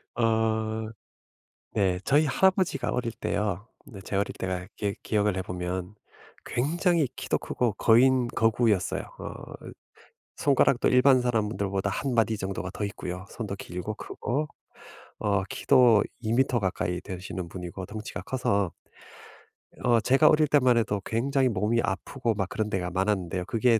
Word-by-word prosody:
어 110 -1 0 0.8
네 95 -3 +1
저희 145 +7 +3
할아버지가 185 -4 +2
어릴 120 -2 -1
때요. 105 -2 -2 0.2
내 105 -7 -11
제 95 - -5
어릴 100 +1 0
때가 95 -1 -3
기 100 -1 -2
기억을 105 -3 +1
해 - - 0
보면 90 +1 -4 0.5
굉장히 165 +4 +1
키도 - - -1
크고 120 -4 -1
거인 125 +4 +4
거구였어요. 115 -4 +1 0.2
어 - - -6 1.0
손가락도 135 -3 +3
일반 130 +1 +5
사람들보다 105 -4 -1
1 135 +6 -2
마디 115 -1 +2
정도가 95 -1 -4
더 105 - -3
있고요. 90 -2 -6
손도 105 -4 -5
길고 90 +3 -5
크고 145 +8 -3 0.7
어 100 -2 +1
키도 125 -6 +5 0.2
2m 120 +2 +2
가까이 90 -2 -1
되시는 95 -1 -6
분이고 90 +1 -6
덩치가 105 -2 -6
커서 100 -7 0 1.1
어 120 -2 +4
제가 135 +7 +4
어릴 155 0 +5
때만 130 -4 +4
해도 105 -3 0
굉장히 130 +3 +1
몸이 110 +2 +1
아프고 115 +4 -2
막 95 -2 -1
그런 110 -1 -2
데가 90 -3 -2
많았는데요. 95 -2 -1
그게 115 +2 +2
110 Hz, 290 characters per minute, -27 LUFS, 95-125 Hz, 1.1 s, 일반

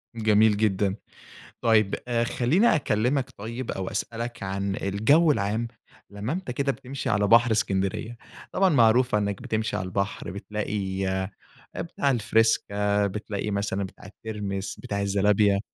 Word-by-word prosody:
جميل 110 -1 +4
جدًا. 100 -2 +1 0.7
طيب 110 -3 +3
آآ 120 -1 +1
خلّيني 150 - +3
أكلّمك 125 -1 0
طيب 115 +4 -5
أو 95 -1 -4
أسألك 115 +3 -4
عن 100 +1 -2
الجو 110 - +3
العام، 110 0 -1 0.4
لمّا 105 +7 -4
أنت 180 -8 -4
كده 140 +2 0
بتمشي 135 +1 -5
على 105 -1 +2
بحر 115 +2 +5
إسكندرية، 100 +2 -1 0.3
طبعًا 190 -1 +3
معروفة 120 -4 +4
إنّك 100 -1 -2
بتمشي 110 -1 -2
على 95 - -3
البحر 100 -1 -3
بتلاقي، 100 -1 -3 0.7
بتاع 145 -4 -1
الفِرِيسكا، 105 -3 +2
بتلاقي 105 +1 -4
مثلًا 100 -1 -1
بتاع 100 +2 -10
الترمس 100 -2 -5
بتاع 100 -1 -3
الزلابية 100 0 +3
105 Hz, 130 wpm, -26 LUFS, 100-120 Hz, 0.7 s, بحر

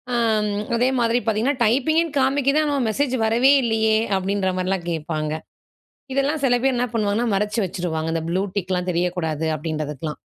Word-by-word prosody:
அம் 220 -3 +1 0.3
அதேமாரி 245 -1 +2
பாத்தீங்கன்னா 235 +5 +1
"டைப்பிங்குன்னு 300 +7 +1
காமிக்குது, 275 +2 +2
ஆனா 290 -1 0 0.2
மெசேஜ் 265 +3 0
வரவே 235 +5 +4
இல்லையே?" 220 -1 +2 0.2
அப்டின்ற 190 0 -1
மாரிலாம் 185 -1 -1
கேட்பாங்க. 155 -1 -3 0.8
இதெல்லாம் 275 +3 0
சில 250 -2 +4
பேர் 265 -1 +2
என்ன 245 +1 +1
பண்ணுவாங்கன்னா 215 +1 0
மறைச்சு 210 +3 0
வச்சுருவாங்க. 165 -3 -3
இந்த 165 - -1
ப்ளூ 180 +3 0
டிக்ல்லாம் 185 -2 -2
தெரியக்கூடாது 170 -3 -1
அப்டின்றதுக்கலாம். 150 -1 -4
215 Hz, 140 wpm, -22 LUFS, 175-250 Hz, 0.8 s, வரவே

